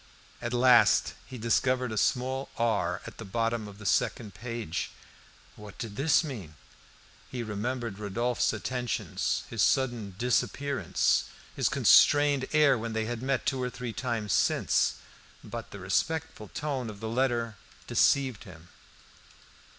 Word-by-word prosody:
At 120 - -3
last 125 -1 +5
he 130 - -8
discovered 125 +2 +1
a - - -3
small 130 +5 0
R 115 -3 0
at - - -10
the - - -5
bottom 115 +2 -1
of 100 -1 -11
the 105 - -11
second 105 +2 0
page. 115 -3 -4 0.7
What 105 -2 -12
did 110 -3 -6
this 150 +7 +3
mean? 105 - -7 0.7
He 125 -2 -4
remembered 110 0 -3
Rodolphe's 120 +4 0
attentions, 125 +2 -2
his 115 - -1
sudden, 120 -8 +1
disappearance, 135 +4 +1 0.3
his - - +1
constrained 145 -2 +5
air 145 -5 +4
when 115 0 -4
they 110 0 -1
had 120 0 -4
met 130 -2 -1
two 130 -1 0
or 125 - -1
three 125 -1 -6
times 115 -3 -2
since. - - +2 0.5
But 115 +1 -7
the - - -9
respectful 110 - -2
tone 135 -1 -3
of 105 -2 -9
the 110 - -5
letter 115 -2 0 0.3
deceived 130 -6 +2
him. 90 -1 -13
120 Hz, 140 wpm, -29 LUFS, 105-130 Hz, 0.7 s, last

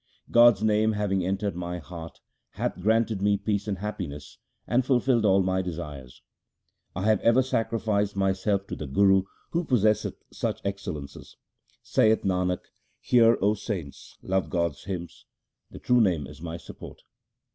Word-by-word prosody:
God's 120 -3 +6
name 110 0 +3
having 100 -3 0
entered 95 +2 -2
my 90 0 -4
heart 80 0 -10 0.3
hath - - -3
granted 110 0 +1
me 100 0 +3
peace 105 0 -2
and 100 -2 -2
happiness, 90 -8 -6 0.3
and 125 +2 +2
fulfilled 125 -3 +2
all 95 -1 +4
my 95 0 0
desires. 75 -8 -7 0.7
1 90 - -4
have 110 -2 +3
ever 115 +3 +4
sacrificed 110 -4 -1
myself 95 +1 0
to - - -6
the 75 - -6
Guru 95 +6 +4 0.3
who 170 +1 0
possesseth 110 - +1 0.2
such - - -2
excellences. 95 -8 -6 0.5
Saith 110 0 +3
Nanak, 90 -1 -1 0.3
hear, 115 -2 +4
O 105 +1 +4
saints, 85 - -6
love 95 0 -1
God's 85 -5 -2
hymns: 90 -3 -7 0.4
The - - -11
true 125 -1 +3
Name 85 -9 +1
is 75 +3 -12
my 85 -1 -5
support. - - -12
100 Hz, 145 wpm, -26 LUFS, 90-110 Hz, 0.7 s, God's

